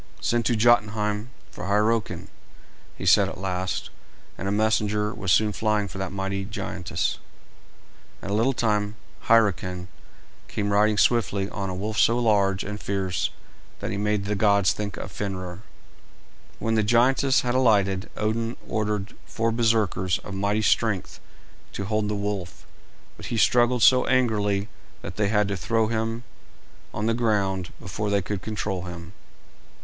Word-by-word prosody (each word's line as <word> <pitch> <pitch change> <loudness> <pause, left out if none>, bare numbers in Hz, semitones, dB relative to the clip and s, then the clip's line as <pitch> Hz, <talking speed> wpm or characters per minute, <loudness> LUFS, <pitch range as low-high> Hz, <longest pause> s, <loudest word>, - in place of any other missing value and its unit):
"Send 120 -1 +1
to 120 - +2
Jotunheim 105 -1 +2 0.2
for - - -7
Hyrroken," 105 +2 0 0.7
he - - -6
said - - +5
at - - -8
last; 95 0 -3 0.4
and 95 - -5
a - - 0
messenger 105 0 +1
was 95 -6 -2
soon 105 +3 +4
flying 105 -2 0
for 95 +1 -8
that 95 -2 -3
mighty 95 0 -3
giantess. 95 -3 -3 1.0
In 100 - -4
a - - 0
little 115 +6 +2
time, 105 -3 0 0.3
Hyrroken 95 -5 +2 0.6
came 100 -1 -2
riding 105 +1 +3
swiftly 100 -3 +2
on 100 -2 -3
a 90 - -4
wolf 105 +3 -3
so 115 - +4
large 100 -5 +2
and 105 +1 -6
fierce 95 -2 -1 0.5
that - - -4
he 100 - -2
made 105 0 0
the 105 - -1
gods 100 -3 +3
think 105 -1 -5
of - - -6
Fenrer. 95 -3 -5 1.0
When 115 - -1
the 110 - +3
giantess 130 +5 +3
had 120 -1 -1
alighted, 100 -7 +2
Odin 115 +2 -1
ordered 105 -1 -2
four 115 0 -1
Berserkers 110 -6 +1
of 100 - -7
mighty 100 +2 0
strength 105 -4 +1 0.5
to 100 - -4
hold 105 +1 0
the 105 - -1
wolf, 100 -3 -4 0.5
but - - -8
he 115 - -2
struggled 120 +1 +3
so 130 -1 +6
angrily 105 -6 +1 0.4
that 85 +1 -7
they 105 -1 +2
had 105 0 +2
to 100 - -1
throw 110 +3 0
him 115 +1 -2 0.7
on 105 - -3
the 115 - +2
ground 100 -6 0
before 105 +1 -4
they 100 -1 +1
could 100 0 -4
control 100 -4 -3
him. 85 0 -8
105 Hz, 155 wpm, -25 LUFS, 95-110 Hz, 1.0 s, so